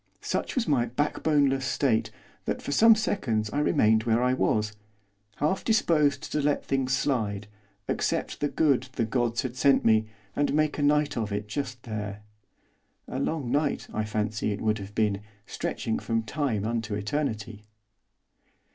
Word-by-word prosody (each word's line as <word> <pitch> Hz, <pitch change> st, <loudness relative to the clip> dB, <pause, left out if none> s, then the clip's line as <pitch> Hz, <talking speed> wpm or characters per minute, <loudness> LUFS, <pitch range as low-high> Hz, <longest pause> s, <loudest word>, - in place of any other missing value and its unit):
Such -, -, -2 dB
was 250 Hz, -4 st, 0 dB
my 125 Hz, -5 st, +2 dB
backboneless 140 Hz, +1 st, +1 dB
state 125 Hz, -4 st, +1 dB, 0.4 s
that -, -, -1 dB
for -, -, -5 dB
some 225 Hz, +9 st, +7 dB
seconds 115 Hz, -, -1 dB
I 145 Hz, -, 0 dB
remained 110 Hz, -6 st, +3 dB
where 115 Hz, +1 st, +2 dB
I 125 Hz, 0 st, +3 dB
was, 110 Hz, -4 st, +1 dB, 0.6 s
half 155 Hz, +6 st, 0 dB
disposed 155 Hz, -, +2 dB
to 150 Hz, -, 0 dB
let 145 Hz, 0 st, 0 dB
things 135 Hz, -1 st, 0 dB
slide, 110 Hz, -7 st, -1 dB, 0.4 s
accept -, -, -1 dB
the 145 Hz, -, +1 dB
good 140 Hz, -4 st, +2 dB
the 115 Hz, -, 0 dB
gods 120 Hz, +1 st, 0 dB
had 125 Hz, -1 st, -4 dB
sent 135 Hz, +2 st, +3 dB
me, 110 Hz, -1 st, +4 dB, 0.3 s
and 145 Hz, 0 st, +1 dB
make 155 Hz, -1 st, +1 dB
a -, -, 0 dB
night 145 Hz, -1 st, +2 dB
of 110 Hz, -3 st, -2 dB
it 105 Hz, +1 st, -3 dB
just 125 Hz, +1 st, -4 dB
there. 105 Hz, -2 st, -5 dB, 0.8 s
A 130 Hz, -, -4 dB
long 140 Hz, -4 st, -2 dB
night, 145 Hz, +1 st, 0 dB
I 110 Hz, -, 0 dB
fancy, 105 Hz, 0 st, -1 dB
it 100 Hz, -, -4 dB
would 110 Hz, 0 st, +1 dB
have 100 Hz, +1 st, -9 dB
been, 105 Hz, -2 st, +1 dB, 0.2 s
stretching 110 Hz, -, -3 dB
from 115 Hz, -1 st, -1 dB
time 115 Hz, -4 st, -1 dB
unto 110 Hz, -2 st, -2 dB
eternity. 110 Hz, -1 st, -3 dB
125 Hz, 160 wpm, -27 LUFS, 110-145 Hz, 0.8 s, some